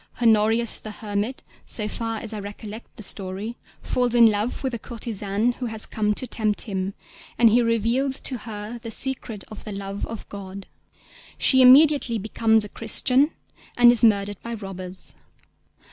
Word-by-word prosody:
_ - - -16
Honorius 225 0 +3
the 215 - -9
hermit, 210 +3 -4 0.2
so 210 -2 +1
far 225 +1 -4
as 225 -1 -1
I 215 - -4
recollect 205 +2 -9
the 220 - -9
story, 195 +4 -2 0.3
falls 245 -1 0
in 235 -1 +7
love 210 +6 -2
with 265 - -1
the 235 - -5
courtesan 215 -1 -2
who 250 - -3
has 220 -1 -3
come 210 -1 -1
to 255 - -2
tempt 215 -3 0
him, 195 -2 -4 0.4
and 230 -2 +5
he 240 +3 +4
reveals 235 +4 +1
to 255 -3 -2
her 215 +2 -7
the 230 0 -8
secret 225 -3 0
of 215 - -10
the 215 - -7
love 195 0 -5
of 225 -1 -8
God. 195 -1 -9 0.7
She 260 -1 +5
immediately 265 -2 +6
becomes 220 +1 +1
a - - -9
Christian, 250 +6 +2 0.5
and 240 0 +8
is 240 0 +3
murdered 205 -2 +3
by 235 0 -5
robbers. 190 -3 -4
220 Hz, 170 wpm, -23 LUFS, 205-240 Hz, 0.7 s, and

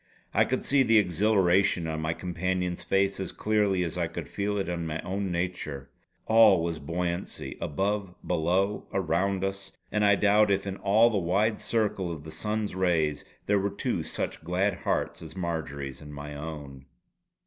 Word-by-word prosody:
I - - +4
could - - -2
see 140 0 +4
the 115 -3 +5
exhilaration 95 -2 +3
on 80 -1 -3
my 80 +1 0
companion's 90 0 -2
face 95 0 +1
as 95 - -3
clearly 105 -4 +1
as 85 - -3
I - - +1
could - - -6
feel 105 +1 -2
it 100 - -1
in 85 -1 -3
my 80 0 -3
own 95 0 -2
nature. 85 -6 -3 0.3
All 110 -6 +6
was 85 -1 -2
buoyancy, 85 +4 -3
above, 95 +4 -1
below, 90 +4 0
around 95 +2 0
us; 95 0 -4 0.2
and 105 0 +1
I 100 -1 +6
doubt 105 +1 +4
if 100 0 +1
in 95 0 -4
all 110 +4 +4
the 105 - +1
wide 100 +5 +1
circle 105 -6 0
of 80 -3 -7
the 80 - -9
sun's 105 +6 -2
rays 85 -5 +1 0.2
there 105 0 +3
were 100 +1 0
two 100 - -2
such - - -4
glad 90 +4 +1
hearts - - -2
as 80 0 -9
Marjory's 80 -6 -4
and 75 -1 -10
my 75 +1 -7
own. 70 -3 -7
95 Hz, 175 wpm, -28 LUFS, 80-100 Hz, 0.3 s, All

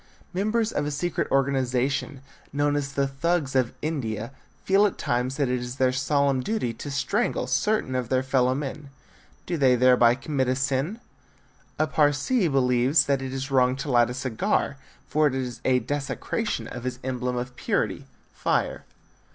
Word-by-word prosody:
Members 215 +4 0
of 145 - -1
a - - 0
secret 155 +4 -2
organization 135 +1 0 0.3
known 145 +1 +1
as 140 -1 -2
the 140 0 +1
Thugs 140 0 -1
of 130 -3 +2
India 120 -7 -3 0.3
feel 200 +2 +5
at - - -6
times 125 +3 -1
that 140 -2 +1
it 125 0 0
is 125 +1 -6
their 130 -1 +2
solemn 135 0 +1
duty 125 - -1
to 145 - -7
strangle 195 - 0
certain 210 -11 0
of 125 -2 -2
their 130 0 +2
fellow 130 -1 +2
men. 140 +1 -5 0.6
Do 175 - -2
they 130 -4 +4
thereby 125 -1 +5
commit 135 0 -1
a 130 - +1
sin? 135 - -1 0.8
A 155 - +2
Parsee 155 - +2
believes 130 0 +3
that 140 -1 +1
it 130 -1 -4
is 135 +1 -4
wrong 130 -1 +3
to 135 +1 -4
light 120 -1 +4
a 125 - -4
cigar, 130 +1 -1 0.3
for 155 +1 +3
it 135 - -1
is 125 -2 -4
a 130 -1 +3
desecration 145 - -2
of 125 - -7
his 125 0 -3
emblem 125 -1 -2
of 125 +1 -4
purity - - -1 0.3
fire. - - -1
135 Hz, 170 wpm, -25 LUFS, 125-145 Hz, 0.8 s, feel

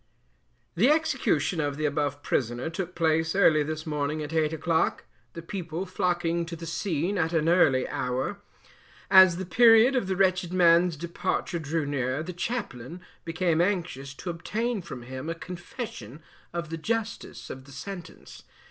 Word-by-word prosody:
The 220 - +3
Execution 265 - +1
of 145 -1 -2
the 155 - -1
above 145 -1 -1
prisoner 120 +4 -1
took 180 +1 -5
place 160 0 +1
early 160 -6 +5
this 155 +1 -4
morning 150 0 -2
at 150 +2 -6
eight 155 -1 +2
o'clock, 160 +1 0 0.3
the 165 - -8
people 175 -1 -4
flocking 175 -2 0
to 170 - -5
the 165 0 -8
scene 175 +2 -1
at 165 0 0
an 160 -1 +1
early 145 -7 +4
hour. 130 +11 -3 0.7
As 190 -3 +8
the 190 - -4
period 230 +6 +6
of 245 -7 0
the 190 - 0
wretched 185 -2 +1
man's 175 -2 +4
departure 170 +1 -2
drew 155 0 -2
near, 135 0 -1
the 180 +2 -6
chaplain 175 - -4 0.2
became 165 0 +1
anxious 170 -8 -2
to 175 - -5
obtain 215 +6 -2
from 155 -8 -8
him 130 +5 -6
a 165 - -2
confession 175 - -8 0.3
of 170 -2 -5
the 165 - -3
justice 225 +6 -4
of 130 0 -9
the 140 - -14
sentence. 175 +5 -9
165 Hz, 160 wpm, -27 LUFS, 150-185 Hz, 0.7 s, As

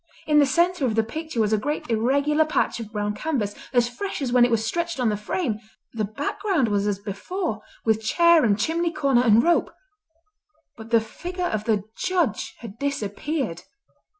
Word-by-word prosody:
In 300 -1 +4
the 285 - +5
centre 345 +3 +2
of 220 - -1
the 225 - +3
picture 315 +3 -5
was 215 -1 +2
a 215 - +3
great 295 +7 -3
irregular 280 +7 +2
patch 310 -5 0
of 220 -2 -7
brown 210 -1 -2
canvas, 225 -5 -2 0.2
as 245 -2 +3
fresh 385 +12 -5
as 265 -4 -2
when 250 -1 +6
it 245 - +4
was 225 -1 +1
stretched 340 0 -2
on 245 -3 +2
the 210 - 0
frame. 215 - -2 0.3
The 220 -2 -1
background 290 - -1
was 205 0 +1
as 205 -2 0
before, 215 - -4 0.2
with 220 -1 +2
chair 340 +7 +5
and 205 -3 +3
chimney 335 +8 0
corner 275 -6 +2
and 230 -1 +5
rope, 345 0 +2 1.0
but 225 -1 -11
the 230 -1 +4
figure 355 +11 -5
of 215 -9 -2
the 215 -4 +1
Judge 350 - -1
had 230 -1 -10
disappeared. 275 - -2
245 Hz, 185 wpm, -24 LUFS, 215-315 Hz, 1.0 s, when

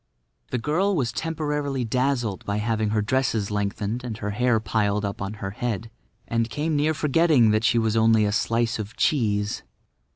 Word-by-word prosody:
The 125 - -1
girl 175 - +1
was 125 -8 0
temporarily 150 -3 -2
dazzled 120 -4 0
by 100 0 -2
having 110 0 0
her 105 0 +1
dresses 115 -3 0
lengthened 105 +3 -2
and 115 -3 -5
her 105 -1 -3
hair 120 +2 +2
piled 105 -1 0
up 100 -1 -4
on 100 +1 -3
her 95 -2 -5
head, 115 0 -3 0.4
and 115 0 0
came 150 +7 -1
near 155 +2 +2
forgetting 150 -5 +4
that 110 +1 +1
she 120 - +3
was 110 -1 +1
only 110 -1 +4
a 105 - +1
slice 115 +1 0
of 105 +1 -6
cheese. 105 -7 +1
115 Hz, 175 wpm, -24 LUFS, 105-130 Hz, 0.4 s, forgetting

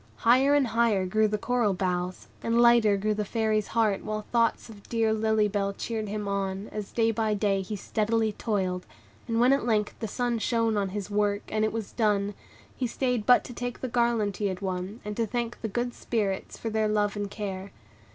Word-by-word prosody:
Higher 260 - +4
and 285 -2 +4
higher 225 -5 +2
grew 215 +4 +2
the 210 0 -1
coral 230 -3 +1
boughs, 180 0 -2
and 230 +1 +1
lighter 235 -4 +5
grew 210 +2 0
the 210 0 -1
Fairy's 215 0 0
heart, 220 -4 +1
while 215 0 -3
thoughts 230 -1 +2
of 210 -3 -14
dear 225 -2 +2
Lily 220 -1 +2
Bell 200 -1 -1
cheered 220 +1 -4
him 210 0 -3
on, 195 0 -2
as 210 -2 -6
day 225 -1 +2
by 220 -1 0
day 200 -1 +1
he 190 +3 -5
steadily 220 +2 0
toiled; 190 -4 -2 0.4
and 230 -1 0
when 250 +3 +5
at 275 - +1
length 215 -3 +1
the 225 - -3
sun 240 +2 -1
shone 230 -1 +1
on 200 -2 0
his 205 +1 -5
work, 205 0 +1
and 215 0 0
it 215 - +1
was 225 -2 -4
done, 205 -3 +1 0.4
he 255 - -1
stayed 245 -3 -1
but 250 - +6
to 245 - -9
take 245 0 -5
the 260 - -2
garland 235 -5 +1
he 205 - 0
had 185 -2 -3
won, 190 +3 -4
and 210 0 -4
to 230 -1 +1
thank 240 +1 -3
the 225 - -2
good 240 +3 -2
Spirits 200 -5 -2
for 225 - -4
their 220 0 +1
love 210 -1 +1
and 205 -1 -3
care. 200 -2 -5
215 Hz, 210 wpm, -27 LUFS, 200-230 Hz, 0.4 s, but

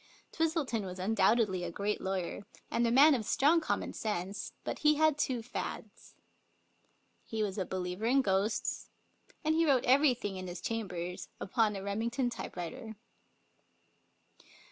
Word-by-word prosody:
Twistleton 315 -9 0
was 185 -1 -6
undoubtedly 195 -1 +2
a 175 - -3
great 200 +4 -2
lawyer, 190 0 -3 0.3
and 235 0 +2
a - - +1
man 285 +5 +7
of 240 -5 0
strong 300 +9 +3
common - - -2
sense, 200 -2 -3
but - - -4
he 300 0 +4
had 310 0 +4
two 255 -5 -1
fads. 245 - -7 1.1
He 220 -1 -2
was 200 -1 -3
a 185 - -2
believer 185 +2 -3
in 270 +2 +4
ghosts, 195 +1 0 0.5
and 310 +1 +2
he 330 +1 +3
wrote 275 -6 +3
everything 250 -7 +3
in 185 0 -6
his 175 0 -6
cham 225 -2 -3
bers 180 0 -5
upon 215 +1 +1
a 195 - -5
Remington 235 +5 -1
typewriter. 220 +2 -6
220 Hz, 145 wpm, -32 LUFS, 190-260 Hz, 1.1 s, man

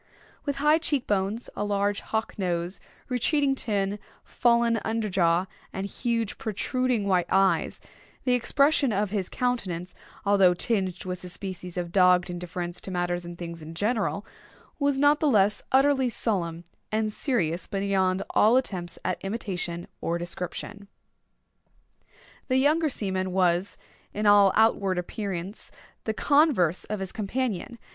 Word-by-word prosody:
With 285 -2 -1
high 300 +3 +4
cheek 290 -5 0
bones, 205 +3 -1
a - - -2
large 205 0 0
hawk 220 0 -2
nose, 175 0 -2 0.3
retreating 275 +3 +2
chin, 205 -5 -1 0.2
fallen 235 -1 +2
under 220 -1 -1
jaw, 175 -1 +2 0.3
and 195 - -4
huge 230 +1 -2
protruding 235 +1 -1
white 180 -3 +2
eyes, 195 0 +2 0.4
the 250 - +2
expression 280 +2 +3
of 205 -1 0
his 200 -4 -2
countenance, 190 -9 -2 0.3
although 195 -3 +5
tinged 190 -3 -1
with 180 0 -5
a 180 - -7
species 180 -1 -7
of 175 -1 -3
dogged 180 -1 +4
indifference 175 0 -5
to - - -7
matters 175 -1 -2
and 175 0 -8
things 170 -1 -7
in 160 +1 -9
general, 210 +1 -1 0.5
was 285 -1 +2
not 290 +2 +4
the 305 - +2
less 205 -3 +3
utterly 265 -1 +4
solemn 175 -8 -1 0.3
and 215 0 0
serious 180 - -1
beyond 195 -2 0
all 225 +4 +5
attempts 180 -9 -2
at 185 0 -2
imitation 185 -5 -4
or 170 - -1
description. 180 +4 -6 1.6
The 255 -1 +2
younger 305 +4 +3
seaman 190 -6 -2
was, 180 +1 +1 0.4
in 210 +1 -1
all 205 -1 +7
outward 200 -4 +3
appearance, 190 +1 -5 0.4
the 220 - 0
converse 280 - +3
of 210 -2 -4
his 190 - -4
companion. 225 +1 -3
200 Hz, 140 wpm, -26 LUFS, 180-235 Hz, 1.6 s, all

